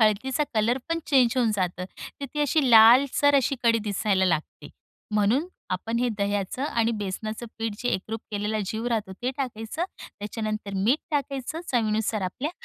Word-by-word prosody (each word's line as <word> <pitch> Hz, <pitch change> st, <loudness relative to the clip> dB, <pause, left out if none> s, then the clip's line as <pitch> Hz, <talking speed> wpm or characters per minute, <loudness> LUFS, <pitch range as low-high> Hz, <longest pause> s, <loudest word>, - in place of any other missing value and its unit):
हळदीचा 230 Hz, +7 st, +2 dB
कलर 230 Hz, +4 st, +2 dB
पण 330 Hz, 0 st, 0 dB
चेंज 255 Hz, -5 st, +4 dB
होऊन 240 Hz, -3 st, +3 dB
जातं, 180 Hz, -2 st, -2 dB, 0.4 s
तर -, -, -3 dB
ती 295 Hz, -, -1 dB
अशी 290 Hz, -2 st, +2 dB
लालसर 255 Hz, +6 st, +7 dB
अशी 275 Hz, 0 st, +2 dB
कढी 230 Hz, -1 st, +4 dB
दिसायला 200 Hz, -2 st, 0 dB
लागते. 165 Hz, -4 st, -2 dB, 0.5 s
म्हणून 220 Hz, -, +2 dB, 0.3 s
आपण 225 Hz, +6 st, -2 dB
हे 245 Hz, 0 st, +1 dB
दह्याचं 200 Hz, +4 st, -1 dB
आणि 230 Hz, -4 st, +1 dB
बेसनाचं 215 Hz, +3 st, -4 dB
पीठ 225 Hz, -2 st, -2 dB
जे 245 Hz, -, -2 dB
एकरूप 220 Hz, +4 st, -2 dB
केलेला 210 Hz, +1 st, -1 dB
जीव 220 Hz, +4 st, -3 dB
राहतो, 215 Hz, -5 st, -1 dB
ते 245 Hz, +7 st, -3 dB
टाकायचं. 250 Hz, +4 st, -3 dB, 0.3 s
त्याच्यानंतर 215 Hz, -1 st, -4 dB
मीठ 225 Hz, +10 st, +2 dB
टाकायचं, 280 Hz, +2 st, -2 dB
चवीनुसार 220 Hz, -2 st, +1 dB
आपल्या. 255 Hz, -, -3 dB
225 Hz, 155 wpm, -26 LUFS, 210-255 Hz, 0.5 s, लालसर